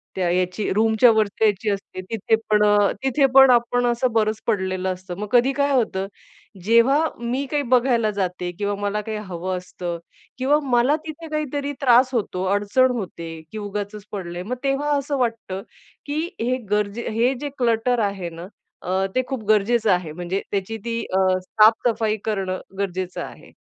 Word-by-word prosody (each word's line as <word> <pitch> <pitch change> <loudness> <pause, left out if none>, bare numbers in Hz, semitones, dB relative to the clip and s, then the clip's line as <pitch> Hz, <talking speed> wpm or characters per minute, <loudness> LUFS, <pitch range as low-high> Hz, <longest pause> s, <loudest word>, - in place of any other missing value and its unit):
त्या 180 -2 0
याची 185 +3 -1
रूमच्या 220 +3 +5
वरती 215 0 0
जायची 210 0 +1
असते. 195 -2 -4
तिथे 220 +3 0
पण 210 0 +4
अ, 205 -1 +4
तिथे 270 +1 +3
पण 270 -1 +9
आपण 245 +1 +2
असं 240 +1 +1
बरंच 215 -1 +1
पडलेलं 185 -3 0
असतं. 180 -1 -8
मग 210 - -3
कधी 250 +2 +4
काय 280 0 +1
होतं? 195 -6 0 0.6
जेव्हा 235 +7 +4 0.2
मी 250 +4 -2
काही 290 -1 +1
बघायला 240 -3 +3
जाते 180 -3 -3
किंवा 205 0 -1
मला 205 +1 -1
काही 215 -1 -3
हवं 185 -2 -4
असतं 180 -1 -5 0.4
किंवा 280 +4 +3
मला 255 +2 +3
तिथे 320 +1 -8
काहीतरी 290 -2 -2
त्रास 255 0 +5
होतो, 190 -5 -1
अडचण 250 +6 +2
होते, 170 -7 -6
की 220 - -7
उगाचच 205 0 -5
पडलंय. 180 -3 -5
मग 250 +6 -3
तेव्हा 275 +2 0
असं 280 0 -2
वाटतं 225 -6 -2 0.4
की 290 +1 -3 0.2
हे 250 +2 +1
गरजे 210 +2 -1
हे 235 +4 +2
जे 290 - -3
क्लटर 240 0 +1
आहे 195 -4 -3
ना? 170 +2 -9 0.3
अ, 190 +1 0
ते 255 - +3
खूप 260 -5 -4
गरजेचं 215 +1 +3
आहे 180 -4 0
म्हणजे 175 +4 -3
त्याची 200 +3 -2
ती 230 0 -2
अ, 190 0 +3 0.2
साफ-सफाई 220 +1 +3
करणं 190 -4 -2 0.2
गरजेचं 185 -2 -3
आहे. - - -12
215 Hz, 165 wpm, -22 LUFS, 190-245 Hz, 0.6 s, पण